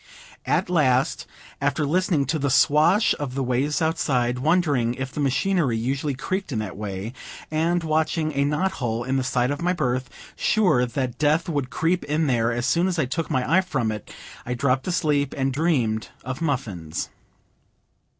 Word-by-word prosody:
At - - +1
last, 135 -7 +1 0.3
after 145 +2 +1
listening 170 -2 +1
to 155 +4 -1
the 140 0 0
swash 155 - +4
of 135 -3 -4
the 135 - 0
waves 135 +6 0
outside, 125 -6 0
wondering 145 -6 +2
if 130 0 -4
the - - -6
machinery 145 - +1
usually 135 +4 -1
creaked 190 +6 -3
in 120 - -2
that 105 -3 -4
way, 100 +2 -5 0.4
and 165 +2 +1
watching 155 0 0
a 140 0 +1
knot 150 +7 +1
hole 115 -1 -1
in 130 +2 0
the 130 - 0
side 125 0 +1
of 145 - -3
my 180 +1 +1
berth, 130 -6 -1 0.3
sure 180 -13 +2
that 125 -1 -3
death 155 +3 +2
would 145 -6 -2
creep 165 +6 0
in 150 +2 0
there 120 -4 +1
as 120 0 -2
soon 170 +9 +2
as 180 -2 -1
I 155 - +2
took 160 +5 -3
my 130 +7 +2
eye - - +3
from 120 -12 -1
it, 105 -1 -7 0.3
I 125 - -3
dropped 130 +1 0
asleep, 150 -6 +1
and 135 -1 0
dreamed 130 -8 0 0.2
of 130 +3 -5
muffins. 110 - -3
140 Hz, 180 wpm, -24 LUFS, 125-160 Hz, 0.4 s, swash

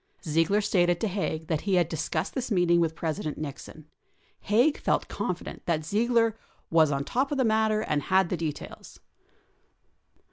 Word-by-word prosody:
Ziegler 165 +6 +2
stated 175 -4 +2
to 220 - 0
Haig 180 -5 -3
that 160 -2 -1
he 195 -2 0
had 175 -3 +3
discussed 160 -1 -3
this 255 -2 -3
meeting 175 -4 +3
with 160 -1 0
President 155 -1 -3
Nixon. 150 +1 -8 0.5
Haig 245 +9 +2
felt - - 0
confident - - -5
that 155 -3 0
Ziegler 230 +4 +2 0.2
" - - -38
was 160 -2 +4
on 140 0 -1
top 265 - -1
of 290 - -1
the 260 - +2
matter 220 -1 +2
and 150 -8 -1
had 190 0 +2
the 180 - -1
details." 155 -3 -6
175 Hz, 170 wpm, -27 LUFS, 160-215 Hz, 0.5 s, was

